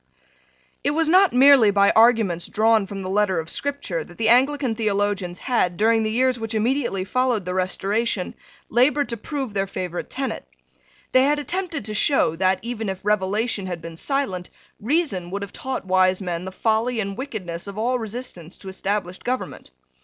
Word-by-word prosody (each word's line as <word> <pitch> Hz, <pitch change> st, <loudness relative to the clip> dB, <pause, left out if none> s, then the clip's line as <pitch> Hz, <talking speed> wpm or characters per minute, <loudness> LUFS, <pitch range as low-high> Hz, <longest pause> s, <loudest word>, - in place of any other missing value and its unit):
It 290 Hz, -, 0 dB
was 325 Hz, -1 st, +3 dB
not 375 Hz, +3 st, +5 dB
merely 260 Hz, -3 st, +7 dB
by 200 Hz, 0 st, +4 dB
arguments 220 Hz, -7 st, +3 dB
drawn 220 Hz, -1 st, +2 dB
from 195 Hz, 0 st, -6 dB
the -, -, -5 dB
letter 195 Hz, -3 st, +2 dB
of 160 Hz, 0 st, -5 dB
Scripture 275 Hz, -, -3 dB
that 175 Hz, -, -15 dB
the 225 Hz, -1 st, +1 dB
Anglican 265 Hz, +1 st, +3 dB
theologians 205 Hz, -4 st, -1 dB
had, 180 Hz, -8 st, 0 dB
during 225 Hz, +1 st, +3 dB
the 215 Hz, -, 0 dB
years 250 Hz, +2 st, +1 dB
which 225 Hz, 0 st, -4 dB
immediately 230 Hz, -4 st, 0 dB
followed 250 Hz, -3 st, 0 dB
the 180 Hz, -, -3 dB
Restoration, 195 Hz, +2 st, -1 dB, 0.3 s
laboured 280 Hz, +5 st, +2 dB
to 235 Hz, -, -2 dB
prove 265 Hz, -1 st, -5 dB
their 195 Hz, -1 st, 0 dB
favourite 180 Hz, -2 st, -5 dB
tenet. 270 Hz, 0 st, -4 dB, 0.6 s
They 255 Hz, +1 st, +5 dB
had 295 Hz, +1 st, +2 dB
attempted 335 Hz, -, -3 dB
to 215 Hz, -, -3 dB
show 210 Hz, -, +2 dB
that, 185 Hz, +1 st, +2 dB
even 225 Hz, -3 st, -4 dB
if 190 Hz, +1 st, -6 dB
revelation 210 Hz, 0 st, 0 dB
had 175 Hz, -2 st, -4 dB
been 165 Hz, 0 st, -9 dB
silent, 190 Hz, -, -2 dB, 0.3 s
reason 225 Hz, -, -1 dB
would 200 Hz, +2 st, -4 dB
have 200 Hz, -, -9 dB
taught 260 Hz, -5 st, -4 dB
wise 185 Hz, 0 st, +3 dB
men 180 Hz, -2 st, -4 dB
the 190 Hz, -, -5 dB
folly 225 Hz, +4 st, 0 dB
and 200 Hz, -2 st, -3 dB
wickedness 195 Hz, -10 st, -6 dB
of 200 Hz, 0 st, -8 dB
all 245 Hz, +3 st, 0 dB
resistance 215 Hz, -7 st, -7 dB
to 195 Hz, -, -9 dB
established 190 Hz, -1 st, -3 dB
government. 255 Hz, +1 st, -4 dB
215 Hz, 175 wpm, -23 LUFS, 190-255 Hz, 0.6 s, merely